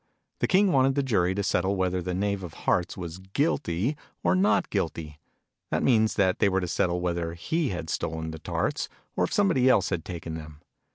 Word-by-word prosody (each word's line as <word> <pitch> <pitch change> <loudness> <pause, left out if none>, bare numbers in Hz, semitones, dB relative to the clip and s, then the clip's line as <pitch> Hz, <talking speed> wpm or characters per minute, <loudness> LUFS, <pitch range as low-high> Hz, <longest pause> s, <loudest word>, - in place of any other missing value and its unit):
The - - +1
King 195 0 +4
wanted 135 -1 +3
the 140 - +1
Jury 95 -8 +1
to 100 - -1
settle 95 0 +1
whether 95 -1 0
the 90 +1 -3
Knave 100 +1 -1
of 90 -4 -8
Hearts 90 - +1
was 85 -1 -6
guilty 95 - 0 0.3
or - - +3
not 190 +2 +2
guilty 80 -6 -3 0.5
that - - 0
means 110 -4 +3
that 95 -2 +2
they 100 - +4
were 95 0 +1
to 90 - -3
settle 90 +1 0
whether 85 -1 -2
he 155 - -1
had 85 -3 -4
stolen 80 0 -3
the 80 - -8
Tarts, - - -2 0.3
or 90 - +2
if - - -7
somebody 170 -11 +3
else - - +4
had 85 -3 -1
taken 85 -2 -6
them. 75 -2 -8
95 Hz, 205 wpm, -27 LUFS, 85-115 Hz, 0.5 s, King